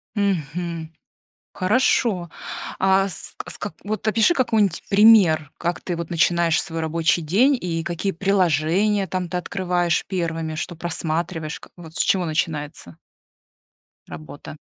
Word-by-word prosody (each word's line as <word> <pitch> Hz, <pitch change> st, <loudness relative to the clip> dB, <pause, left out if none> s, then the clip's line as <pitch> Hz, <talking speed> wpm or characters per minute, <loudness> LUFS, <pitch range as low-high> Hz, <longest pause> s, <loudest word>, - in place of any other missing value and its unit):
Мгм. 170 Hz, -4 st, -2 dB, 0.6 s
Хорошо. 205 Hz, -3 st, +1 dB, 0.5 s
А, 190 Hz, +1 st, +3 dB
ск 170 Hz, -, -3 dB
ск 205 Hz, -, -5 dB
вот 215 Hz, +1 st, -4 dB
опиши 220 Hz, +8 st, +4 dB
какой-нибудь 220 Hz, -, +1 dB
пример, 195 Hz, -8 st, +5 dB
как 175 Hz, +1 st, -2 dB
ты 175 Hz, -, -3 dB
вот 170 Hz, -1 st, -5 dB
начинаешь 170 Hz, 0 st, +2 dB
свой 165 Hz, -1 st, -5 dB
рабочий 165 Hz, +2 st, +1 dB
день 235 Hz, -, +3 dB
и 165 Hz, -2 st, -3 dB
какие 175 Hz, +3 st, -2 dB
приложения, 190 Hz, +2 st, +1 dB
там, 185 Hz, -1 st, -3 dB
ты 180 Hz, -, -2 dB
открываешь 180 Hz, -2 st, -1 dB
первыми, 165 Hz, -4 st, -3 dB
что 175 Hz, +1 st, -4 dB
просматриваешь, 165 Hz, -1 st, -3 dB
как -, -, -16 dB
вот, 165 Hz, -2 st, -12 dB
с -, -, -4 dB
чего 185 Hz, -2 st, +2 dB
начинается 150 Hz, -, -3 dB, 1.1 s
работа. 80 Hz, -1 st, -10 dB
175 Hz, 125 wpm, -22 LUFS, 160-195 Hz, 1.1 s, пример